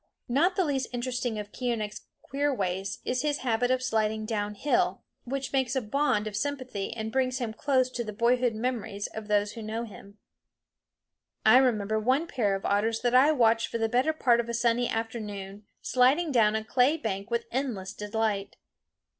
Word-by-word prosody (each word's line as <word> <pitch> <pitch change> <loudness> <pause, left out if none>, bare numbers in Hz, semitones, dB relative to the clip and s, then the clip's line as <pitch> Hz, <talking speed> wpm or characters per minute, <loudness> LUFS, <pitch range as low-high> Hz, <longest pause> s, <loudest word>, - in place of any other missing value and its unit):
Not 325 +10 +2
the 375 - +2
least 270 -4 -1
interesting 245 -2 -2
of 205 -1 -6
Keeonekh's 230 -4 -3 0.2
queer 285 +2 0
ways 195 -5 -2
is 250 0 0
his 295 -1 0
habit 245 +1 +1
of 255 0 +1
sliding 220 -3 0
down 210 -1 -2
hill, 290 +8 0 0.2
which 270 +1 -4
makes 265 -1 +1
a 265 - +1
bond 220 -2 +1
of 215 -1 -5
sympathy 255 -4 -3
and 220 -1 -4
brings 255 0 0
him 240 -4 -3
close 260 0 +2
to 240 - -3
the 215 - -5
boyhood 235 +2 +2
memories 220 -3 -3
of 220 -1 -7
those 205 -1 +1
who 230 - -8
know 220 +2 -3
him. 200 -2 -12 1.3
I 220 +3 +8
remember 220 -5 +2
one 260 +8 +2
pair 215 - 0
of 195 - -6
otters 220 +3 +1
that 245 -1 +1
I 265 +4 +6
watched 230 -5 +3
for - - -3
the 225 -1 +1
better 250 +7 +2
part 245 -6 +3
of 235 0 -2
a 235 - -1
sunny 235 +1 +1
afternoon 210 -3 -5 0.2
sliding 275 +6 +3
down 220 -4 +4
a 220 - -1
clay 255 +7 +3
bank 200 -5 -4
with 235 0 -1
endless 230 -8 -3
delight. 210 -1 -2
235 Hz, 185 wpm, -28 LUFS, 215-255 Hz, 1.3 s, I